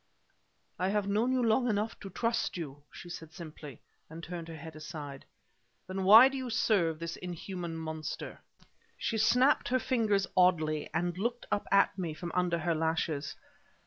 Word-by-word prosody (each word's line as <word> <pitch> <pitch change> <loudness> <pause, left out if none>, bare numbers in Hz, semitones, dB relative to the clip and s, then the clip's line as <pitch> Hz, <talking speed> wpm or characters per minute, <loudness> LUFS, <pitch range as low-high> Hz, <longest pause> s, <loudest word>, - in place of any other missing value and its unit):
"I 185 +1 +1
have 205 0 0
known 215 +5 +1
you 255 -1 +2
long 235 +2 +3
enough 215 +1 -1
to 195 - -8
trust 230 +1 -1
you!" 145 -4 -6
she - - -10
said 160 -2 -8
simply, 155 -6 -10 0.3
and 165 +1 -9
turned 170 -1 -6
her 165 - -7
head 160 0 -9
aside. 150 -3 -8 0.6
"Then 190 +1 -3
why 220 +6 +10
do 270 - -4
you 260 -1 -4
serve 190 -8 +2
this 165 +1 -5
inhuman 175 -1 -5
monster?" 160 -1 -5 0.6
She 225 - -1
snapped 250 +6 +4
her 255 - +2
fingers 220 -6 +1
oddly, 160 -5 +3
and 175 0 -1
looked 235 +3 -2
up 205 - 0
at 200 -1 +4
me 165 -4 -3
from 170 +1 -6
under 180 -1 +1
her 165 +1 0
lashes. 160 -2 -1
175 Hz, 170 wpm, -31 LUFS, 160-215 Hz, 0.6 s, why